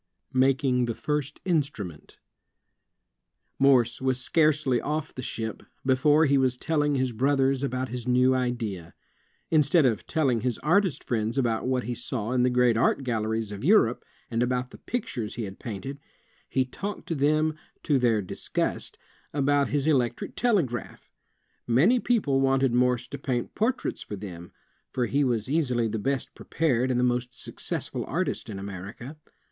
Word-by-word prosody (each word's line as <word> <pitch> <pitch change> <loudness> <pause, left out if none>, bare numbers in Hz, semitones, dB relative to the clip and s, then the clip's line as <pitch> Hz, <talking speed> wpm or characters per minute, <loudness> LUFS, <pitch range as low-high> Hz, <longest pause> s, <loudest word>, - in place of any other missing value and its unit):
'' - - -40
Making 130 -2 +2
the 115 -2 -3
First 150 -1 -3
Instrument 140 - -2 1.4
Morse 130 -4 +4
was 130 -1 +1
scarcely 150 -3 +2
oflF 150 0 -3
the 130 - -6
ship, 110 -3 -4 0.2
before 145 +4 +4
he 140 -1 +3
was 130 -1 +1
telling 150 0 +1
his 130 -1 0
brothers 135 +2 +2
about 130 -1 -2
his 125 0 -5
new 125 +1 +4
idea. 115 -9 -3 0.6
Instead 155 0 +4
of 115 -5 0
telling 130 -8 +1
his 125 -2 -1
artist 180 +1 +2
friends 115 +1 -1
about 120 -3 0
what 130 -1 0
he 125 - -3
saw 120 -1 -4
in 125 -1 +2
the 125 - +4
great 125 -2 +3
art 135 - +2
galleries 110 -3 -1
of 100 0 -7
Europe, 150 - +4 0.3
and 115 0 0
about 125 0 0
the - - -13
pictures 125 - -4
he 120 - -3
had 95 -2 -7
painted, 125 +6 -6 0.5
he 130 -1 +1
talked 200 +10 -6
to - - -1
them, 155 +2 +2 0.3
to 145 -4 +2
their 115 -4 +2
disgust, 90 - -3 0.4
about 145 0 +2
his 145 -1 0
electric 130 -7 0
tele 225 -7 +3
graph. 120 -4 -7 0.6
Many 160 - +4
people 195 - +1
wanted 135 -2 +2
Morse 125 0 +2
to - - -6
paint 125 -4 -2
portraits 245 +4 -1
for 105 - -6
them, 90 -4 -9 0.4
for 125 - -1
he 140 +4 +1
was 120 -4 0
easily 130 -6 +1
the 110 0 -3
best 135 +4 -2
prepared 130 -6 0
and 125 -1 +1
the - - +2
most 125 0 -1
successful - - -4
artist - - -2
in 100 - -5
America. 100 - -7
130 Hz, 165 wpm, -27 LUFS, 120-145 Hz, 1.4 s, Morse